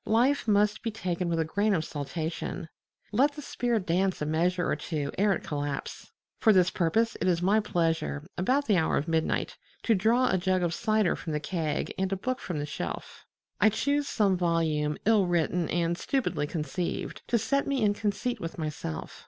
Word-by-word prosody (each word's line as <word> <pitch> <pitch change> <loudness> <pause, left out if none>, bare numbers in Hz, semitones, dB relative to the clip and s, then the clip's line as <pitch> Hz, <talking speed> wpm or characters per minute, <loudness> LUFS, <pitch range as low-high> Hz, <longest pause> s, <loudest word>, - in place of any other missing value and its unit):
Life 255 +4 +3
must 210 0 +3
be 230 - -2
taken 180 -5 -2
with 165 -1 0
a 160 - +1
grain 205 +5 +1
of 160 - 0
saltation: 160 +3 -4 0.4
let 275 +7 +3
the 295 - -8
spirit 235 -7 -1
dance 185 +2 +1
a 150 - -2
measure 175 +3 +1
or - - +1
two 150 -2 -3
ere 205 +1 +3
it - - -4
collapse. 145 -2 -4 0.3
For 220 - +5
this 185 -3 +4
purpose 225 +7 +1
it - - +1
is 175 -1 +2
my 205 +4 +4
pleasure, 165 -6 -1
about 260 +10 +1
the 210 -7 +3
hour 160 - +2
of 145 - -2
midnight, 160 -1 0 0.3
to 230 - +3
draw 230 +6 +3
a 190 - +2
jug 185 0 +1
of 170 -1 0
cider 215 -2 +1
from 160 - -5
the 150 - 0
keg 155 -2 -2
and 190 0 0
a - - +1
book 255 +6 -2
from 175 - -4
the 145 - -2
shelf. 85 - -6 0.3
I 210 - +6
choose 285 +6 0
some 200 -7 +2
volume 160 -4 +1
ill 210 -3 +4
written 175 0 +1
and 170 0 +1
stupidly 240 - -1
conceived, 170 +3 -3
to 235 - +2
set 275 +5 0
me 275 -4 0
in 205 -1 +4
conceit 215 +4 -2
with 165 -1 -6
myself. 150 - -5
180 Hz, 195 wpm, -28 LUFS, 160-215 Hz, 0.4 s, I